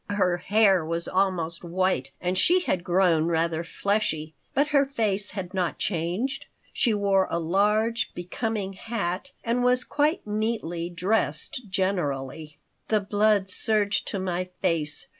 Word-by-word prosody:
Her 185 -3 +1
hair 195 -2 +3
was 170 +1 -3
almost 180 -3 0
white 175 -6 0
and 180 +1 -1
she 355 - +4
had 185 - -1
grown 175 -3 +3
rather 165 0 0
fleshy, 165 -5 -1 0.2
but 285 +2 +3
her 285 -2 +4
face 215 -7 -1
had 185 -1 -5
not 180 -3 -1
changed. 185 - -2 0.3
She 240 - +2
wore 200 -2 +2
a - - -1
large, 210 +7 +1
becoming 195 +2 -3
hat 200 +2 -3
and 240 +1 0
was 250 0 +3
quite 300 +5 0
neatly 210 -6 -2
dressed 205 +5 -1
generally 155 -6 -2 0.3
The 215 -2 +2
blood 205 0 +2
surged 205 +1 0
to - - -2
my 185 -1 -2
face. 155 -3 0
190 Hz, 140 wpm, -26 LUFS, 170-215 Hz, 0.3 s, she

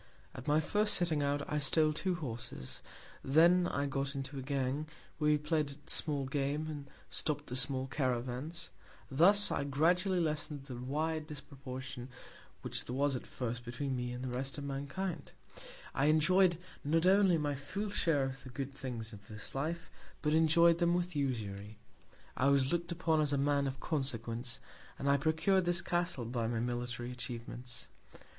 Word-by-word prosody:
At 130 - -9
my 150 +1 +4
first 210 +6 +3
setting 165 -5 +2
out, 145 0 0
I 150 - 0
stole 155 +2 +4
two 180 +3 -1
Horses; 115 - -6 0.4
then 170 +6 +5
I 140 -3 -1
got 140 0 -2
into 135 0 -4
a - - -4
Gang; 135 +2 -1 0.3
where 150 -1 +3
we 150 - +5
play'd 150 0 0
at 145 +2 -7
small 145 -3 +1
Game, 140 +2 -1
and 145 -3 -6 0.2
stopp'd 150 -1 -1
the 125 - -4
small 130 +1 +1
Caravans; 130 - -2 0.4
thus 195 +9 +7
I - - 0
gradually 175 +7 +2
lessen'd 150 -3 -2
the 130 -3 -7
wide 155 +5 -2
Disproportion, 130 -4 -7 0.5
which - - -4
there 125 - -4
was 140 0 +2
at 125 - -6
first 120 -1 -4
between 130 +3 -3
me 125 -1 -3
and 125 +1 -5
the 125 -1 -3
rest 135 +2 -4
of 145 - -5
Mankind: 140 +7 -4 0.6
I 135 - +1
enjoy'd 170 +4 +5 0.3
not 165 +4 +2
only 190 -2 +5
my 145 -2 0
full 190 +10 -4
Share 165 -8 +2
of 135 0 -4
the 130 - -9
good 135 +2 -5
Things 120 -4 -5
of 100 0 -12
this 110 -1 -9
Life, 165 +4 -3 0.3
but 150 -1 +2
enjoy'd 165 +1 +5
them 170 0 +3
with 180 -1 -1
Usury. 110 -7 -3 0.6
I 130 - +2
was 140 0 +4
look'd 170 0 -1
upon 160 -2 +2
as 145 -1 +1
a - - +2
Man 140 0 +2
of 135 0 -4
Consequence, 120 -6 -3 0.4
and 140 - -3
I 140 0 +5
procur'd 160 +6 +2
this 175 0 +1
Castle 175 -8 -1
by 115 -1 -1
my 115 0 -1
military 120 0 -3
Atchievements. 120 0 -7
140 Hz, 175 wpm, -33 LUFS, 130-160 Hz, 0.6 s, thus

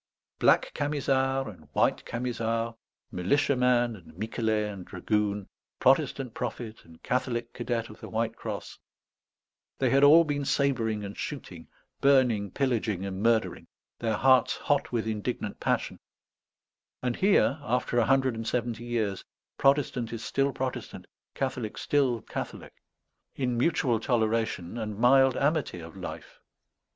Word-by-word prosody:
Black - - +4
Camisard 135 -2 0
and 90 -8 -11
White - - +2
Camisard, 115 -1 -2 0.4
militiaman 125 +3 +2
and 85 -4 -15
Miquelet 110 -1 -1
and 95 -2 -8
dragoon, 105 +2 -1 0.3
Protestant 135 -2 +2
prophet 120 -2 -5
and 80 -1 -18
Catholic 120 -2 -1
cadet 120 -2 -2
of 110 - -13
the - - -8
White 115 0 -1
Cross, - - -6 1.0
they - - +1
had 135 +1 +4
all 155 +4 +8
been 145 -2 -2
sabring 120 -7 0
and 100 +1 -7
shooting, 90 - -7 0.3
burning, 125 -7 +3
pillaging, 110 -6 -1
and 95 0 -4
murdering, 115 0 +1 0.3
their 110 -2 0
hearts 130 +3 +4
hot 145 -1 0
with 115 -2 -1
indignant 110 -3 -3
passion; - - -1 1.0
and 125 -1 -1
here, 190 -6 +3
after 125 -3 0
a 115 - +3
hundred 135 -1 +3
and 115 0 -5
seventy 120 -1 -2
years, 110 -5 -1 0.4
Protestant 135 -4 +2
is 115 -1 -5
still 140 0 +1
Protestant, 130 -1 -5 0.3
Catholic 130 -5 -3
still 130 -6 +1
Catholic, - - -6 0.6
in 125 -3 -1
mutual 125 -3 +2
toleration 115 -4 0
and 105 -2 -4
mild 135 +2 +5
amity 145 - 0
of 80 -1 -10
life. - - -8
120 Hz, 130 wpm, -28 LUFS, 110-135 Hz, 1.0 s, all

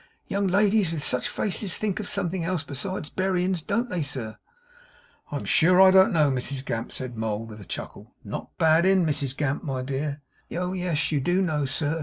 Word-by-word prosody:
'Young 200 0 -1
ladies 200 -1 +3
with 155 -3 -2
such 125 - +2
faces 200 -2 -1
thinks 210 -3 -2
of 210 - -4
something 185 -3 -1
else 170 -2 -1
besides 155 +3 -4
berryins, 185 -1 0
don't 215 +8 -1
they, 180 -8 -2
sir?' 130 -7 -2 1.0
'I - - -3
am - - -4
sure 180 +3 +4
I 190 0 +8
don't 190 +3 +6
know, 155 -6 +3
Mrs 130 +1 -2
Gamp,' 115 0 -3
said 130 -2 -5
Mould, 110 0 -3
with 105 0 -10
a - - -11
chuckle - - -7
'Not - - -7
bad 160 +2 +4
in 190 -2 +4
Mrs 140 -3 -2
Gamp, 145 -1 -1
my 130 -3 -3
dear?' 140 +2 -3 0.3
'Oh 180 +1 -2
yes, 175 -5 -1
you 150 - +1
do 175 +7 +1
know, 150 -5 0
sir! 150 +3 -1
165 Hz, 200 wpm, -25 LUFS, 140-190 Hz, 1.0 s, I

